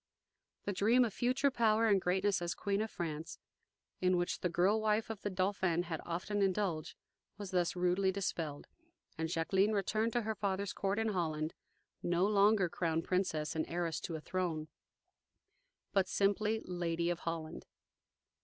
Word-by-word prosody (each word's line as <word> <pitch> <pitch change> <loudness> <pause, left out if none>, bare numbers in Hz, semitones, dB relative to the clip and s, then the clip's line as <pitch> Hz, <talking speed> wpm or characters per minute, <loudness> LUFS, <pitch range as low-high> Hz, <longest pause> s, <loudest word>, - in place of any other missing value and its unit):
The 205 - -1
dream 230 +6 +4
of 220 - -4
future 265 +3 +2
power 225 -2 +3
and 200 -4 +4
greatness 190 +2 +1
as 175 0 -2
Queen 200 0 0
of 220 - -2
France, 160 -3 -5 0.6
in 185 0 +3
which 175 +1 -1
the 180 - 0
girl 190 +6 +2
wife 215 +1 +1
of 215 -2 -7
the 205 - -2
Dauphin 185 -2 +1
had 165 -3 -4
often 185 +5 -2
indulged, 190 -5 0 0.4
was 205 -3 -6
thus 180 -2 +1
rudely 180 +2 +2
dispelled, 165 -6 -3 0.5
and 160 0 -2
Jacqueline 190 +5 +2
returned 215 +3 0
to 240 - +2
her 220 +1 -1
father's 200 -1 -2
court 195 +1 -1
in 225 0 +1
Holland, 160 -5 -1 0.5
no 175 +1 +2
longer 205 -1 +4
crown 165 -1 -1
princess 180 -5 -1
and 155 - -1
heiress 165 -3 -1
to 165 - -5
a 155 - -5
throne, 165 -3 -2 1.2
but 195 -2 +3
simply 210 +3 +1
"Lady 170 -1 -1
of 175 - -3
Holland." 165 -2 -5
185 Hz, 160 wpm, -34 LUFS, 170-205 Hz, 1.2 s, dream